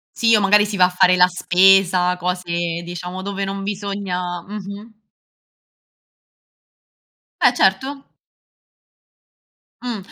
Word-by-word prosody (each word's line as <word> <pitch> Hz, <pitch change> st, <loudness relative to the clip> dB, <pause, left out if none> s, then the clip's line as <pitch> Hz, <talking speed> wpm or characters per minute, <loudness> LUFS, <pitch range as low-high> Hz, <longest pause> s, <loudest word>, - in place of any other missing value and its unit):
Sì, 230 Hz, -1 st, +3 dB
o 210 Hz, -, +2 dB
magari 205 Hz, +1 st, +4 dB
si 210 Hz, 0 st, -5 dB
va 185 Hz, -2 st, +4 dB
a -, -, 0 dB
fare 180 Hz, 0 st, +3 dB
la 180 Hz, 0 st, +5 dB
spesa, 180 Hz, 0 st, +3 dB
cose 175 Hz, -1 st, -3 dB
diciamo 175 Hz, +2 st, -7 dB
dove 200 Hz, 0 st, -4 dB
non 195 Hz, 0 st, -5 dB
bisogna 195 Hz, -3 st, -4 dB
mh-mh. 210 Hz, +2 st, -10 dB, 2.4 s
Eh, 250 Hz, -, +4 dB
certo. 265 Hz, +7 st, 0 dB, 1.8 s
Mh, 245 Hz, -3 st, -4 dB
195 Hz, 105 wpm, -19 LUFS, 180-205 Hz, 2.4 s, la